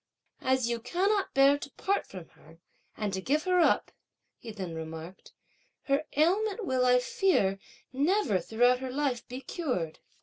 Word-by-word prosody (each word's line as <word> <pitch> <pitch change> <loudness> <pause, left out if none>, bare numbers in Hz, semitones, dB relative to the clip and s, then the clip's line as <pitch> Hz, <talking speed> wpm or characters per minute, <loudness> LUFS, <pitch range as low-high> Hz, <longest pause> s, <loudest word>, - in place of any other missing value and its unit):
'As 260 -2 +1
you 235 -1 -1
cannot 385 - 0
bear 275 +1 +5
to 290 - -7
part 400 +1 -1
from 180 -4 -10
her 160 +2 -19 0.4
and 210 -2 -2
to 190 - -2
give 295 +9 0
her 365 -1 +2
up,' 340 - +3 0.5
he 235 - -10
then 190 -6 -6
remarked, 160 +3 -8 0.5
'her 280 +2 0
ailment 400 +7 +2
will, 260 -5 +1
I 250 0 +6
fear, 245 - +1 0.3
never, 295 - +2
throughout 245 +6 +2
her 260 0 -5
life, 265 -3 -2
be 255 +2 -7
cured. 250 - -3
255 Hz, 160 wpm, -29 LUFS, 195-315 Hz, 0.5 s, I